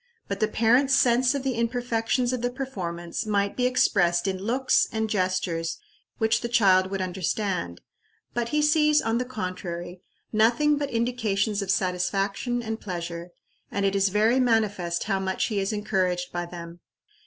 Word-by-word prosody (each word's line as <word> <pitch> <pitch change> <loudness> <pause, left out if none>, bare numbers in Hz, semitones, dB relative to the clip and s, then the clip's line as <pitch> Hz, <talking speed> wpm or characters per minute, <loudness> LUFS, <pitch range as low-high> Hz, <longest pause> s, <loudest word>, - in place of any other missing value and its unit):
But 200 - -3
the 215 - +2
parent's 245 +5 +3
sense 245 +2 +3
of 275 - -2
the 265 -1 0
imperfections 240 +1 0
of 250 - -2
the 245 - 0
performance 190 -8 -5
might 200 -1 0
be 250 0 +2
expressed 175 -8 +2
in 190 -1 -1
looks 245 +7 +2
and 220 -1 -1
gestures 185 -4 -1 0.4
which 220 -1 +2
the 235 - -3
child 190 -6 +4
would 195 -1 -3
understand; 180 - -2 0.5
but 235 -1 -1
he 300 +2 +1
sees, 300 0 +4
on 225 -1 0
the 250 - -1
contrary, 180 -6 -5 0.3
nothing 240 +8 +3
but 285 -1 -2
indications 225 -4 0
of 195 - -5
satisfaction 195 +6 0
and 220 0 -4
pleasure, 170 -2 -5 0.4
and 200 0 -1
it 195 0 +1
is 195 0 +3
very 220 +6 +3
manifest 210 -8 +1
how 195 -2 0
much 190 0 -1
he 210 -3 -1
is 195 +1 -1
encouraged 185 -4 -1
by 175 0 -3
them. 170 0 -9
210 Hz, 165 wpm, -26 LUFS, 185-240 Hz, 0.5 s, child